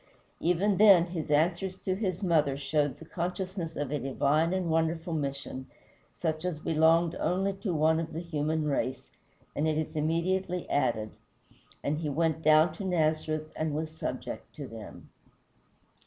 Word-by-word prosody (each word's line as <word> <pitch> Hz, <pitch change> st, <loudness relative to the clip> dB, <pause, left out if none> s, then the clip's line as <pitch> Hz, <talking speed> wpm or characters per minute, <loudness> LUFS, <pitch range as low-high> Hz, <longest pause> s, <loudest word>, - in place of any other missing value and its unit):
Even 180 Hz, +4 st, +2 dB
then, 200 Hz, -5 st, +7 dB
his 170 Hz, -3 st, -5 dB
answers 170 Hz, +5 st, +1 dB
to 185 Hz, -, 0 dB
his 190 Hz, -1 st, -2 dB
mother 155 Hz, -6 st, +2 dB
showed 145 Hz, -1 st, 0 dB
the 160 Hz, -, -12 dB
consciousness 180 Hz, 0 st, -4 dB
of 145 Hz, -2 st, -3 dB
a 150 Hz, -, 0 dB
divine 145 Hz, +5 st, +1 dB
and 185 Hz, -2 st, 0 dB
wonderful 165 Hz, +1 st, 0 dB
mission 140 Hz, -3 st, -4 dB, 0.4 s
such 160 Hz, -1 st, -3 dB
as 180 Hz, -4 st, -2 dB
belonged 165 Hz, +2 st, +3 dB
only 195 Hz, +2 st, +1 dB
to 195 Hz, 0 st, -3 dB
one 160 Hz, 0 st, +3 dB
of 165 Hz, 0 st, -4 dB
the 160 Hz, -, -4 dB
human 155 Hz, -2 st, -1 dB
race, 130 Hz, -3 st, -2 dB, 0.4 s
and 150 Hz, -, +1 dB
it 155 Hz, -1 st, +1 dB
is 155 Hz, 0 st, -3 dB
immediately 175 Hz, +3 st, 0 dB
added, 115 Hz, -6 st, +1 dB, 0.7 s
"And 150 Hz, +2 st, 0 dB
he 155 Hz, -2 st, -2 dB
went 160 Hz, +2 st, 0 dB
down 155 Hz, +1 st, +5 dB
to -, -, -5 dB
Nazareth 155 Hz, -3 st, 0 dB
and 155 Hz, -2 st, -1 dB
was 155 Hz, +1 st, -3 dB
subject -, -, -5 dB
to -, -, -6 dB
them." -, -, -10 dB
160 Hz, 155 wpm, -29 LUFS, 150-175 Hz, 0.7 s, then